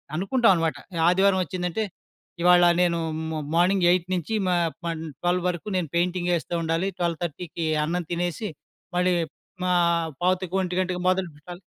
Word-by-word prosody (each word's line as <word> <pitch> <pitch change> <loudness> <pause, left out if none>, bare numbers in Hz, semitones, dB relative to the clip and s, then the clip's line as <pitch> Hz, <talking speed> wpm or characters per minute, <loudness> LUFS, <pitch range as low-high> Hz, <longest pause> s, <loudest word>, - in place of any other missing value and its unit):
అనుకుంటావనమాట. 185 - +2 0.3
ఆదివారం 190 +1 +3
వచ్చిందంటే 180 +5 -2 0.6
ఇవాళ 175 0 +6
నేనూ 170 -2 +2 0.3
మ 155 - -2 0.2
మార్నింగ్ 180 +1 +3
8 180 0 +2
నుంచి 180 +4 -2
మ - - +2 0.3
పన్ 165 -1 -3 0.2
12 175 0 +1
వరకు 180 +4 -5
నేను 180 -4 0
పెయింటింగేస్తూ 175 -1 0
ఉండాలి. 165 +3 0
12:30కి 170 -1 -3 0.2
అన్నం 170 +2 -2
తినేసి, 175 +4 -2 0.5
మళ్ళీ 180 +1 +3 0.6
ఆహ్, 170 -1 +2
12:45కి 185 0 0
మొదలు 185 -1 +1
పెట్టాలి. 175 +4 -11
175 Hz, 125 wpm, -25 LUFS, 170-185 Hz, 0.6 s, ఇవాళ